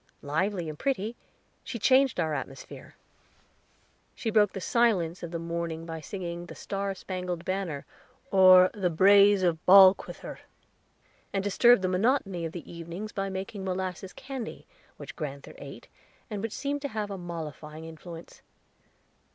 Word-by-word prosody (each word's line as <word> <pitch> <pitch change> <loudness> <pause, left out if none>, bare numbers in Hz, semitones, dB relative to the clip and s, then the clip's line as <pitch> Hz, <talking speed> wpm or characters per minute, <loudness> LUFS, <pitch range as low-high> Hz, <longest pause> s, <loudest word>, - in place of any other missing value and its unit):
Lively 175 +4 -1
and 155 -1 -7
pretty, 235 -4 -1 0.5
she 235 - -5
changed 260 0 +3
our 160 -2 0
atmosphere. 135 -1 -7 1.2
She 225 - -3
broke 210 -2 +4
the 195 - -4
silence 185 -6 +1
of 170 - -5
the 170 - -4
morning 165 -1 -4
by 165 -1 -6
singing 175 -1 -6
the - - -10
"Star 195 0 -3
spangled 180 -2 -5
Banner," 185 -7 -3 0.5
or 185 -1 +7
the 195 -5 0
"Braes 200 +3 +6
of 165 -3 +1
Balquhither," 190 0 +5 0.9
and 195 -1 -1
disturbed 220 +2 +5
the - - +2
monotony 195 -2 0
of 165 - -4
the 170 -1 -8
evenings 170 +5 -7
by 195 0 -3
making 190 +1 -5
molasses 185 0 -4
candy, 270 -3 -7 0.3
which - - -9
grand'ther 140 -3 -6
ate, - - -10 0.4
and 205 -2 -3
which 225 0 -4
seemed 285 0 -3
to 285 - -2
have 215 -5 -4
a 195 - -4
mollifying 160 -2 -7
influence. 165 +1 -11
185 Hz, 145 wpm, -28 LUFS, 170-205 Hz, 1.2 s, or